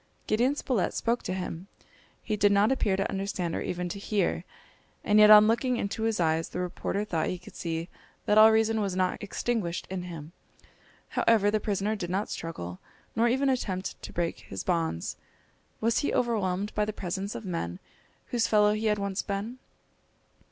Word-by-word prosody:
Gideon 245 +6 +2
Spilett 250 -9 -1
spoke 235 +1 0
to 185 - -3
him. 180 -1 -5 0.6
He 215 - -1
did 205 0 +4
not 205 +4 +4
appear 210 -7 +1
to 195 - 0
understand 190 -3 -2
or - - -2
even 180 0 -3
to 200 - -5
hear. 195 -4 -1 0.6
And 210 0 +4
yet 210 0 +8
on 210 0 +10
looking 240 +2 +1
into 200 +1 -3
his 225 -2 0
eyes, 160 -1 +1
the - - -5
reporter 180 +3 -2
thought 165 -6 -1
he 185 - -2
could 180 - -14
see 165 0 -3 0.4
that 210 - +3
all 215 +1 +9
reason 220 0 +2
was 195 -3 -1
not 185 -1 0
extinguished 205 -3 -2
in 190 -1 -3
him. 165 -3 -8 0.8
However, 210 -3 +3
the 215 - +1
prisoner 205 +1 -1
did 175 -5 -5
not 195 +4 -1
struggle, 90 - -6 0.4
nor 230 +1 +3
even 265 +4 +2
attempt 195 -8 -2
to - - -8
break 170 -1 -2
his 95 - -7
bonds. 165 - -1 0.6
Was 230 +1 +2
he 285 - 0
overwhelmed 205 -4 0
by 210 - +1
the 215 0 -2
presence 195 +1 -4
of - - -6
men 90 - -3 0.5
whose 235 -2 +1
fellow 210 -1 +4
he 215 +1 -1
had 210 -1 +2
once 200 -1 -2
been? 210 +5 -4
200 Hz, 185 wpm, -28 LUFS, 180-220 Hz, 0.8 s, on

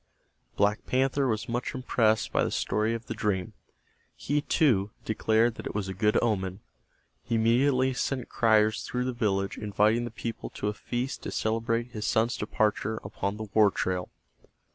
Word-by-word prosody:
Black 105 +1 +1
Panther 135 +1 +1
was 110 -3 -1
much 120 +4 -3
impressed 110 -4 +1
by - - +2
the - - 0
story 110 +2 0
of 115 0 -7
the - - -4
dream. 95 -4 -1 0.6
He, 145 +1 -1
too, 115 -11 +2 0.2
declared 110 +1 +2
that - - -6
it - - -7
was 105 -2 -1
a 95 - -4
good 105 +3 +2
omen. 95 -4 -1 0.6
He 115 - -2
immediately 130 +4 +3
sent 125 +1 -2
criers 110 -2 +3
through 125 0 -2
the 130 - -1
village 100 -4 -1
inviting 105 +3 +2
the - - -4
people 115 0 -5
to 105 - -1
a - - -2
feast 120 +5 -4
to - - -5
celebrate 115 +2 -1
his 105 -3 -4
son's 115 +1 +2
departure 110 0 0
upon 100 0 -3
the 110 -1 -6
war 105 -2 +6
trail. 90 -2 -2
110 Hz, 170 wpm, -28 LUFS, 105-120 Hz, 0.6 s, war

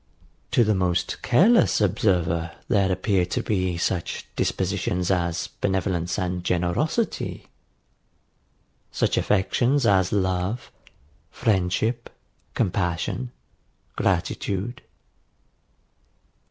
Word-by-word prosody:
To 120 - +4
the 110 -1 +2
most 90 -2 -1
careless 220 - +4
observer 85 -4 +1
there 100 -4 +2
appear 95 0 +1
to - - -2
be 95 -4 0
such 85 0 -2
dispositions 95 -1 -1
as 85 -2 0
benevolence 95 -2 -1
and 90 -1 -2
generosity; 90 - -1 1.4
such - - +1
affections 125 +8 +2
as 95 -3 +3
love, 95 +3 -1 0.6
friendship, 110 +2 0 0.5
compassion, 100 +4 -1 0.6
gratitude. 95 +4 -1
95 Hz, 80 wpm, -24 LUFS, 90-110 Hz, 1.4 s, To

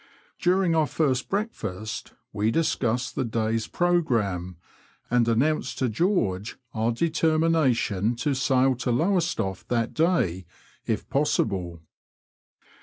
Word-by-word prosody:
During 180 -1 +2
our 160 -2 +3
first 135 -6 0
breakfast 110 - -4 0.2
we 105 +1 +1
discussed 125 -4 0
the 135 - -1
day's 115 -1 -1
pro 175 -1 +2
gramme, 100 - -1 0.6
and 120 -1 +3
announced 125 +4 +1
to 130 - 0
George 110 - 0 0.2
our 110 +1 0
determination 155 - +1
to 140 +5 -1
sail 130 0 +2
to 125 - -3
Lowestoft 160 - 0
that 115 -2 0
day 95 - +1 0.4
if - - -1
possible. 95 - 0
125 Hz, 110 wpm, -25 LUFS, 110-160 Hz, 0.6 s, our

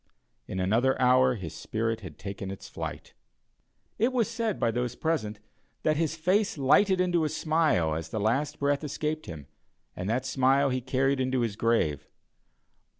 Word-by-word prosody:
In 95 - -4
another 115 +8 +2
hour 125 0 +4
his 95 -7 -7
spirit 115 0 -2
had 90 -7 -10
taken 95 0 -6
its 95 - -8
flight. - - -7 0.9
It 235 +4 +3
was 245 -4 +1
said 225 -3 -2
by 115 - +2
those 125 +1 -2
present, 125 -11 -2 0.4
that 155 - +2
his 160 0 0
face 185 +4 +1
lighted 185 +8 +4
into 175 -2 +2
a 155 - 0
smile 155 - +1
as 80 +1 -4
the 110 - -3
last 125 +8 0
breath 140 +1 0
escaped 155 +1 -3
him, 75 -4 -8 0.5
and 90 +2 -4
that 125 +3 0
smile 135 +1 +3
he 130 0 -1
carried 135 +2 +1
into 130 -1 0
his 115 -4 -1
grave. 80 -11 0
130 Hz, 165 wpm, -28 LUFS, 110-155 Hz, 0.9 s, hour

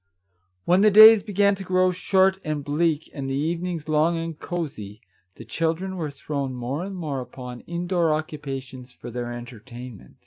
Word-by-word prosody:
When 180 +2 +4
the 215 - +6
days 215 +1 +9
began 200 0 +2
to 195 0 -6
grow 185 0 +2
short 190 +1 +2
and 155 -2 -3
bleak, 155 +2 0
and 135 -2 -5
the 135 - -1
evenings 165 +2 -2
long 155 +2 +2
and 165 0 -4
cosey, 120 - -5 0.4
the - - -11
children 165 +4 -2
were 160 -4 -3
thrown 140 -2 -4
more 125 +6 -3
and 195 0 -6
more 150 -7 -3
upon 125 0 -9
indoor 175 -1 0
occupations 135 -4 -5
for 120 - -10
their 120 0 -4
entertainment. 120 -1 -10
155 Hz, 165 wpm, -24 LUFS, 130-180 Hz, 0.4 s, days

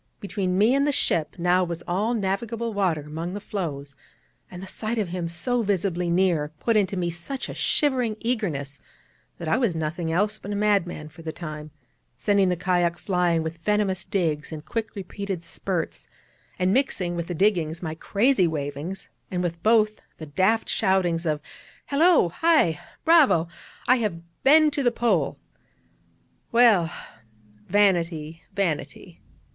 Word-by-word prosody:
Between 195 -2 -2
me 215 +5 +4
and 280 +1 +2
the - - +3
ship 165 - +1
now 180 +1 +3
was 170 -1 -4
all 210 +7 0
navigable 225 +3 -2
water 185 -6 +1
among 160 +5 -5
the - - -3
floes, 145 -9 -5 0.5
and 180 - -9
the 190 - -7
sight 220 +4 -3
of 205 -5 -1
him 175 -1 -3
so 200 +9 0
visibly 185 -4 0
near 170 -4 +2
put 230 - +1
into 195 -2 +2
me 175 -1 -1
such 175 +11 -5
a - - -6
shivering 250 -7 +1
eagerness, 165 - -2 0.6
that 170 - -6
I 160 - +2
was 225 -10 +1
nothing 160 +1 -2
else 210 +5 0
but 205 - -7
a - - -2
madman 200 -7 0
for 165 +2 -14
the 160 -1 -4
time, 155 -2 -7 0.5
sending 200 -2 +2
the 180 - +1
kayak 175 -1 +1
flying 175 -4 +1
with 160 +1 -5
venomous 195 0 0
digs 160 -6 -1
in 155 -1 -6
quick 225 +3 -4
repeated 195 -2 -5
spurts, 175 -1 -4 0.5
and 185 +1 +2
mixing 195 -10 0
with 170 -1 -3
the 175 - -4
diggings 170 -3 +1
my 160 -2 -3
crazy 200 +4 +2
wavings, 150 +4 -4 0.2
and 180 -1 -2
with 170 -1 -3
both 215 +1 +3 0.2
the 160 - -7
daft 190 +10 +1
shoutings 180 -4 +1
of 150 -1 0 0.4
'Hallo! 310 - +4
Hi! 240 - +3 0.3
Bravo! 300 - +5 0.4
I 255 - +6
have 170 -7 -5
been 305 +2 +6
to 285 - -1
the 245 -2 +3
Pole!' 235 0 +1 1.1
Well, 220 -8 +5 0.8
vanity, 170 -5 +1
vanity. 185 -7 -3
185 Hz, 155 wpm, -25 LUFS, 165-215 Hz, 1.1 s, I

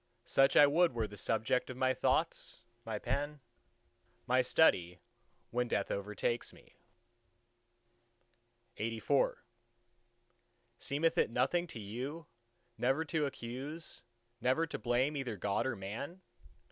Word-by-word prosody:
Such 135 0 +4
I 145 - +10
would 165 +2 +3
were 115 -2 0
the 105 -1 -9
subject 110 +5 0
of 130 - -6
my 130 0 +3
thoughts, 135 -1 0 0.2
my 110 -2 -3
pen, 145 +6 -2 0.9
my 125 +1 +4
study, 90 - +3 0.5
when 125 +1 0
death 100 -3 -1
overtakes 105 +4 -2
me. - - -19 2.1
LXXXV 115 +5 +1 1.4
Seemeth 150 +4 +1
it - - +3
nothing 175 0 +1
to 120 - -8
you, 130 +10 -5 0.5
never 135 +6 +2
to 150 -1 0
accuse, 135 +6 -6 0.4
never 130 +7 +2
to 160 - -5
blame 130 +5 +1
either 125 -6 -3
God 100 +6 0
or 130 - -1
Man? 115 - -6
130 Hz, 120 wpm, -34 LUFS, 115-145 Hz, 2.1 s, I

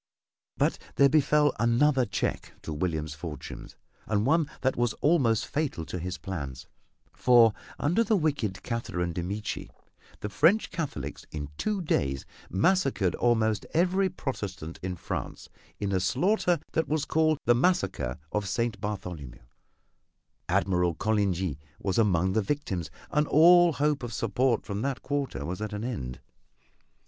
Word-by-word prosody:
But - - +1 0.2
there 140 0 +6
befell 150 0 +4
another 125 +3 +3
check - - -2
to 80 - -4
William's 75 -2 -2
fortunes, 75 0 -8 0.3
and 105 0 +1
one 155 +2 +3
that 130 - +1
was 120 -2 +1
almost 130 -9 +2
fatal 140 - -2
to 90 - -5
his 90 +2 -4
plans, 70 -9 -6 0.5
for 120 -3 +5 0.2
under 175 +10 +2
the 220 0 +2
wicked 140 - -1
Catherine 90 -8 -2
de 85 - -2
Medici 100 +5 -4 0.5
the - - -2
French 165 - +3
Catholics 165 -5 -5
in 75 -2 -5
two 205 - -1
days 70 - 0 0.2
massacred 130 - +2
almost 110 -3 +1
every 185 +3 +3
Protestant 100 - -5
in 90 0 -3
France - - -5 0.3
in 100 -1 -1
a 95 - +2
slaughter 175 - +2
that 160 - 0
was 150 -1 0
called 155 -1 +2
the 120 - +6
Massacre 100 - +1
of 105 -2 -1
St. 115 +1 -1
Bartholomew. 90 - -6 1.1
Admiral 90 -3 +2
Coligny 95 -7 0 0.2
was 95 +1 -1
among 95 -4 +2
the 110 - +2
victims, 95 - -2 0.2
and 150 0 +2
all 175 +2 +7
hope 145 0 +1
of 120 -2 -5
support 115 +3 +1
from 100 0 -3
that 135 +1 -2
quarter 135 - -2
was 90 +5 -4
at 110 0 -4
an 105 +1 -4
end. 65 - -4
110 Hz, 145 wpm, -28 LUFS, 90-145 Hz, 1.1 s, all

